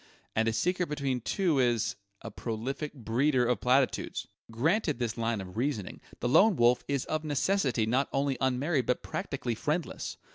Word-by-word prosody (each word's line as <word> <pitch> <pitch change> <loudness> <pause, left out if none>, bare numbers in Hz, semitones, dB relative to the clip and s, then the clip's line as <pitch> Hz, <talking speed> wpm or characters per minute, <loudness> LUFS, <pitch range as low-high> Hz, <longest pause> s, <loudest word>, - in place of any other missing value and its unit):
And 110 0 +2
a 115 - +1
secret 180 +9 0
between 135 -4 -1
two 165 - +1
is 120 -3 +1 0.3
a 115 - -6
prolific 125 +8 -4
breeder 125 +2 +1
of 120 -3 0
platitudes! 130 +1 +1 0.2
Granted 155 - +1
this 115 -2 -2
line 115 -1 -1
of 95 +1 -8
reasoning, 120 -6 -2 0.2
the 120 - 0
Lone 190 - +5
Wolf 120 -1 +4
is 140 -2 -1
of 155 0 -2
necessity 145 - +1
not 130 +5 +1
only 135 0 +1
unmarried 130 +2 +1
but 125 - 0
practically 130 -3 -3
friendless. 150 +9 -3
130 Hz, 160 wpm, -29 LUFS, 115-150 Hz, 0.3 s, Lone